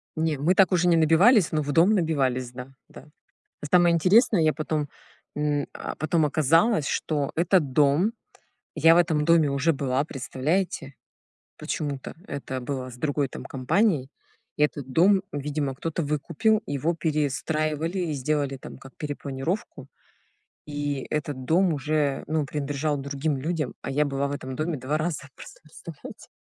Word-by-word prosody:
Не, 160 -2 0
мы 165 +7 +2
так 195 -1 +5
уже 180 -1 +2
не 170 - +5
набивались, 165 +6 +5
но 155 -1 +1
в 145 0 -3
дом 170 +7 +5
набивались, 135 - 0
да, 125 +2 -9
да. - - -14 0.6
А - - -6
самое 175 +1 +4
интересное, 185 - +4
я 155 -1 +3
потом, 150 0 -2 0.5
м, 150 -1 0
а, - - -6
потом 155 +1 +1
оказалось, 155 - +3
что 145 -3 -1
этот 170 -5 +2
дом 150 - +3 0.6
я 165 +1 +6
в 175 - +5
этом 160 -3 +2
доме 165 -3 +4
уже 140 +4 +2
была, 135 0 -1
представляете? 145 +2 -2 0.6
Почему-то 140 -3 -4
это 130 -2 -5
было 130 0 -4
с 120 - -11
другой 145 +1 0
там - - -8
компанией. 145 - +1 0.5
И 150 - +3
этот 145 -3 -2
дом, 190 +6 +4
видимо, 145 -1 -2
кто-то 165 +4 -3
выкупил, 170 +9 0
его 145 +4 -1
перестраивали, 155 +2 -1
и - - -1
сделали 145 0 -1
там - - -10
как 135 - -15
перепланировку. 145 +1 -4 0.8
И 145 -2 -3
этот 145 -4 -3
дом 170 +5 +3
уже, 150 -1 -1
ну, 155 0 0
принадлежал 145 +1 -2
другим 140 +1 -2
людям, 150 -1 -2
а - - -4
я 145 +2 +2
была 140 0 -1
в - - -4
этом 130 -2 -5
доме 155 +2 -2
2 140 +5 -2
раза, 160 -2 -2
просто - - -13
представляете. 155 0 -11
150 Hz, 155 wpm, -25 LUFS, 140-165 Hz, 0.8 s, я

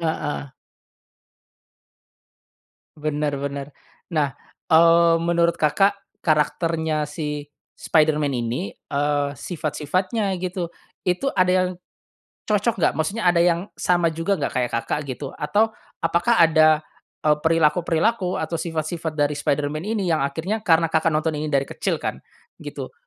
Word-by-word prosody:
heeh. 145 -3 -3 2.4
Bener 150 -1 -1
bener 140 0 -4 0.4
nah, 150 -5 0 0.4
eee, 165 0 +6
menurut 170 0 +1
Kakak, 195 +7 +3 0.2
karakternya 160 0 +1
si 150 -1 -4 0.3
Spiderman 155 -2 +2
ini, 125 - -2
eee, 145 0 -1
sifat-sifatnya 180 - -2
gitu 180 -1 -3 0.3
itu 180 +8 0
ada 185 0 +3
yang, 185 0 +3 0.8
cocok 210 +2 +1
gak? 180 - +2
Maksudnya 195 +8 -2
ada 175 -1 +4
yang 175 +2 +1
sama 175 -2 +1
juga 165 +5 0
gak 145 - -2
kayak 125 -2 0
Kakak, 115 - -1
gitu 135 +1 -5
atau 210 +9 +1 0.3
apakah 170 +8 +2
ada, 155 -2 +5 0.4
eee, 150 -1 +4
perilaku-perilaku 170 +5 +2
atau 160 +1 -3
sifat-sifat 160 -1 -3
dari 145 -1 +2
Spiderman 145 +1 -1
ini 215 -3 -1
yang 155 - +1
akhirnya 160 +10 -2
karena 165 -4 +3
Kakak, 160 0 +3
nonton 155 -1 0
ini 155 - -2
dari 140 -2 +1
kecil - - -2
kan - - -4 0.4
gitu, - - -7
160 Hz, 125 wpm, -23 LUFS, 150-175 Hz, 2.4 s, eee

